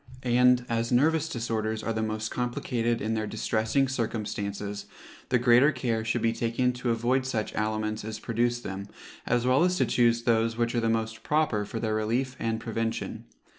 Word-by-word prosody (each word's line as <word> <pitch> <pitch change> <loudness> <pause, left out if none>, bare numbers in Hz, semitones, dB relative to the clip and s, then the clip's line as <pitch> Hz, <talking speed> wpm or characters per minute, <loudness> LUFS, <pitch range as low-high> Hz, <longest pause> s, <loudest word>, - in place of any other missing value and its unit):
And 125 0 +4
as 115 +1 -1
nervous 155 +5 +3
disorders 110 -2 -2
are 115 - -1
the 110 - -1
most 110 0 -2
complicated 120 -1 -1
in 110 +2 -1
their 110 -1 -1
distressing 110 +5 0
circumstances, 105 -4 -3 0.4
the 125 - +4
greater 125 +4 +5
care 120 -4 -1
should 115 +1 -1
be 115 0 +2
taken 120 +2 0
to 125 0 -3
avoid 120 +3 +1
such 115 -5 -2
aliments 110 0 -2
as 110 0 -5
produce 120 +2 -1
them, 100 -1 -6 0.4
as 125 0 +1
well 130 +5 +4
as 180 0 +2
to - - +3
choose 120 -1 +2
those 115 -1 +2
which 115 0 0
are 120 - +1
the 115 - +1
most 110 0 -1
proper 150 -9 +1
for 115 +2 -5
their 110 -2 -1
relief 120 +5 -1
and 115 0 -1
prevention. 115 0 -3
115 Hz, 180 wpm, -27 LUFS, 110-125 Hz, 0.4 s, greater